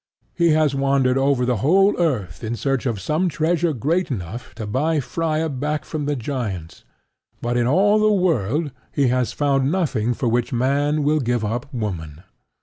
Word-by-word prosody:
He 170 -1 +2
has 155 -2 +2
wandered 135 -2 +2
over 135 -2 +2
the 125 -1 +1
whole 190 - +4
earth 115 - -1
in 115 +1 -2
search 135 +1 -1
of 115 -5 -2
some 155 - 0
treasure 165 +2 +1
great 155 - 0
enough 110 - -6
to 110 -1 -5
buy 150 +9 0
Freia 160 +3 -1
back 150 +1 -3
from 155 -3 -4
the 145 - 0
giants; 110 - -5 0.6
but 120 +1 -2
in 120 -1 +2
all 205 +9 +4
the 215 0 +4
world 155 - +1 0.2
he 140 -3 +2
has 125 -1 +1
found 140 -1 +1
nothing 125 - 0
for 125 - -2
which 120 +1 0
Man 140 +4 +1
will 150 +2 +2
give 120 -4 0
up 120 +5 -3
Woman. 85 - -5
135 Hz, 175 wpm, -21 LUFS, 120-155 Hz, 0.6 s, whole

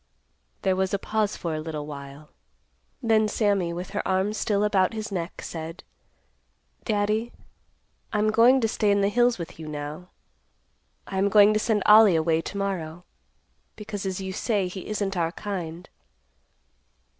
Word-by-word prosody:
There 190 -1 +2
was 190 +1 0
a - - +1
pause 215 +1 -1
for 165 -2 -3
a 155 - -2
little 155 -2 -5
while; 140 0 -9 0.7
then 220 -2 +3
Sammy, 200 -5 +1
with 175 +2 -6
her - - -1
arms 190 +3 +1
still 210 -2 0
about 200 -1 +2
his 215 -1 -5
neck, 175 -2 -4
said, 165 +1 -7 1.0
"Daddy, 215 +2 0 0.8
I'm 215 0 +2
going 240 +4 +5
to 225 - +2
stay 215 -1 0
in 200 0 +3
the 200 - +3
hills 240 +2 +3
with 170 -2 -8
you 160 - -7
now. 150 +4 -6 1.0
I 190 - -3
am 200 +1 +2
going 210 +1 +6
to 215 - +2
send 215 -2 +1
Ollie 210 -3 +7
away 160 0 +2
to 200 - -7
morrow, 175 -4 -3 0.7
because 205 -2 -5
as 190 0 -3
you 190 -1 -5
say, 205 -2 0
he 185 +1 -8
isn't 205 -2 -2
our 170 -1 0
kind. 180 -5 -5
195 Hz, 160 wpm, -25 LUFS, 170-210 Hz, 1.0 s, Ollie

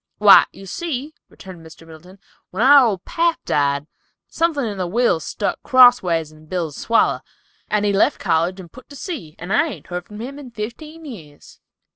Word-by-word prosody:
"Why, 205 -2 +7
you 195 - -13
see," 300 - -5 0.2
returned 185 -4 -13
Mr. 160 0 -15
Middleton, 165 +4 -15 0.3
"when 195 +5 -2
our 275 -1 +7
old 195 -5 -3
pap 335 -1 0
died, 140 0 0 0.4
something 325 -5 -1
in 205 -3 -5
the 180 - -2
will 225 -2 +1
stuck 200 +5 -4
crossways 220 - +4
in 155 0 -18
Bill's 165 -4 -4
swaller, 230 - +1 0.5
and 210 -1 0
he 205 - +1
left 195 - +2
college 170 +4 0
and 175 -3 -12
put 255 - -15
to 285 - -12
sea, 265 - -7
and 180 +4 -5
I 270 - +3
hain't 300 - -9
heard 180 0 -6
from 210 0 -11
him 270 +5 -7
in 270 -3 -10
fifteen 270 +9 -8
years." 160 - -13
205 Hz, 185 wpm, -20 LUFS, 170-260 Hz, 0.5 s, Why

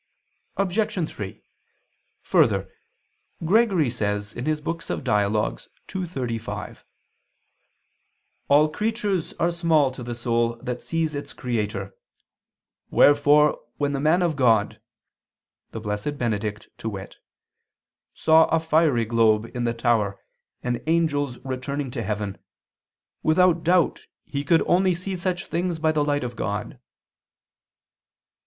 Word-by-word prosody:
Obj. 195 -3 0
3: 100 -8 -8 0.8
Further, - - +2 0.7
Gregory 190 - +3
says 105 -2 -2
(Dial. 120 -8 -1 0.4
ii, 185 -2 -2
35): 120 -8 -5 1.6
"All 150 +2 +6
creatures 210 -1 -1
are 170 - 0
small 165 -5 +2
to 130 - -9
the 120 0 -5
soul 115 -1 0
that 125 +1 -5
sees 165 -2 -1
its 145 0 -6
Creator: 105 -5 -3 1.0
wherefore 145 +1 +5 0.2
when 145 -1 0
the 135 - -1
man 160 +5 +3
of 170 -3 +1
God," 115 -6 +2 0.9
the 115 - -6
blessed 105 +7 -3
Benedict, 105 -3 -2
to 110 - -3
wit, 95 -2 -8 1.0
"saw 160 0 +5
a 165 - +1
fiery 155 -7 +2
globe 115 0 +2
in 120 -1 -1
the 115 - 0
tower 110 -4 +1 0.4
and 120 -1 -1
angels 145 -6 +1
returning 130 +1 -3
to 120 - -4
heaven, 105 -2 -3 0.8
without 170 +1 +3
doubt 175 0 +2 0.2
he 140 -1 -3
could 165 +3 +3
only 185 0 +3
see 185 +2 -4
such 180 0 -2
things 170 +1 -2
by 160 0 +2
the 150 -1 +1
light 145 -1 0
of 120 -1 -5
God." 105 +3 -4
145 Hz, 115 wpm, -24 LUFS, 115-165 Hz, 1.6 s, All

